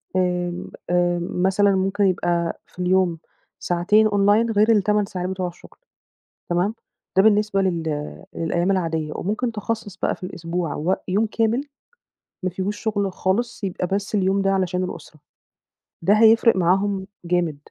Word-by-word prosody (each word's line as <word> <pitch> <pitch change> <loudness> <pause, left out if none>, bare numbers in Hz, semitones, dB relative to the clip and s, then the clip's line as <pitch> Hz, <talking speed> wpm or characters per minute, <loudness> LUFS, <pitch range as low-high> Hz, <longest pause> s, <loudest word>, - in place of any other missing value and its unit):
آمم، 180 -1 -1 0.2
آآ، 175 0 +2
مثلًا 190 +3 +2
ممكن 195 +2 0
يبقى 175 -3 0
في - - -19
اليوم 180 -2 +2 0.4
ساعتين 210 +5 +3
Online 205 +3 +3
غير 215 +1 +4
ال8 210 -1 +2
ساعات 185 -2 -4
بتوع 185 -1 -2
الشُغل 175 - -13 0.7
تمام، 180 +5 +1 0.4
ده 190 - +7
بالنسبة 210 -2 +3
لل 170 -4 0 0.5
للأيام 170 +3 0
العادية، 165 -4 -1
وممكن 220 +5 -2
تخصَّص 215 -2 -4
بقى - - 0
في 195 - -16
الأسبوع 170 -2 -3
وق 170 +6 +1
يوم 205 +4 +2
كامل 225 +3 +1 0.8
ما 185 - +1
فيهوش 190 +3 -3
شُغل 205 -3 -1
خالص 205 +6 -1
يبقى 180 -2 -2
بس 200 +3 -2
اليوم 195 0 +2
ده 195 - +2
علشان 185 -1 0
الأسرة، 160 -4 -8 0.8
ده 190 +5 +4
هيفرق 225 +1 +5
معاهم 190 +2 +1 0.2
جامد. 170 -4 0
190 Hz, 140 wpm, -22 LUFS, 175-205 Hz, 0.8 s, ده